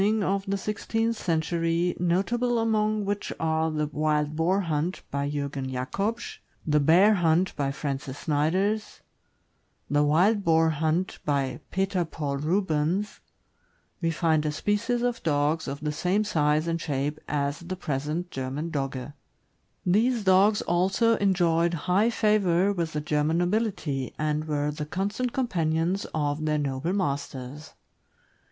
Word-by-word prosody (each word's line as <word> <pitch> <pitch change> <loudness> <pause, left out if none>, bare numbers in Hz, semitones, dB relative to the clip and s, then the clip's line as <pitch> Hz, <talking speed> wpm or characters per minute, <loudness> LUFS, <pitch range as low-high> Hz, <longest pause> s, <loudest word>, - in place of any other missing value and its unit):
ning 215 +1 +2
of 195 +1 0
the 200 0 0
sixteenth 225 +3 -1
century, 165 -1 0
notable 230 +8 +1
among 215 -2 +1
which 205 +1 -2
are 160 0 +1
the 150 -1 -1
uWild 150 0 0
Boar 180 +5 +2
Hunt," 165 +1 -2
by 140 0 -1
Jurgen 140 -2 -3
Jacobsz; 195 - -3 0.3
the 150 -1 +3
"Bear 175 +9 +5
Hunt," 175 -1 +2
by 140 -1 -1
Francis 140 -1 -4
Snyders; 185 +9 0 0.9
the 145 0 +3
"Wild 185 +8 +3
Boar 160 -2 +4
Hunt," 160 +4 -1
by 140 -3 -1
Peter 190 -1 0
Paul 150 -4 -4
Rubens, 170 +4 0 0.8
we 165 - +1
find 160 -2 +1
a 155 - 0
species 210 +9 0
of 245 -1 -1
dogs 150 +1 +1
of 140 +2 -5
the 150 -1 -1
same 180 +7 +1
size 155 -6 +1
and 165 0 -1
shape 145 0 -2
as 140 -1 -1
the 175 +2 -5
present 155 +2 -3
German 135 +5 -4
Dogge. 135 -1 -3 0.7
These 220 +5 +2
dogs 195 +2 +4
also 190 +7 +2
enjoyed 175 -3 +2
high 195 +5 +3
favor 205 -4 +2
with 170 -4 -2
the 150 - -1
German 150 +2 +1
nobility, 175 - -1
and 155 0 -1
were 150 -1 -1
the 150 0 -5
constant 205 +9 -2
companions 175 -6 0
of 145 0 -1
their 155 -1 +1
noble 140 +3 -2
masters. 140 -4 -4
165 Hz, 140 wpm, -26 LUFS, 150-195 Hz, 0.9 s, Bear